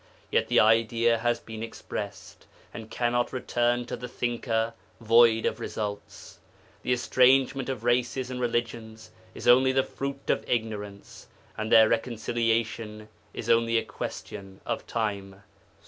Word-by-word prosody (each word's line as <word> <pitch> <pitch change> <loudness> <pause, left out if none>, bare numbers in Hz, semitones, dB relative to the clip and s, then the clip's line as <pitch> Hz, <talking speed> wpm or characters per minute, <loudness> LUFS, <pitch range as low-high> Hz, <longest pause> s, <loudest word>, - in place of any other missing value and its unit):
Yet - - +2
the - - +4
idea 115 +1 +3
has 120 +1 0
been 110 -1 -9
expressed, 115 - -7 0.3
and 110 -1 -8
cannot 120 0 0
return 120 -1 0
to - - -5
the 125 - -7
Thinker 115 -2 -2 0.3
void 115 0 +5
of - - -1
results. 105 -1 -6 0.4
The - - -2
estrangement 130 +2 +3
of 125 -4 -4
races 125 +1 0
and 125 0 -4
religions 115 -2 -3 0.2
is - - -6
only 130 +2 +6
the 135 0 +2
fruit 140 +1 -6
of - - -1
ignorance, 105 -4 -4 0.3
and 110 +1 -4
their 110 -1 +8
reconciliation 115 -2 -1 0.2
is 110 - -7
only 115 0 +3
a - - 0
question 95 -2 -7
of - - -3
time. 100 -3 -3
115 Hz, 135 wpm, -27 LUFS, 110-120 Hz, 0.4 s, their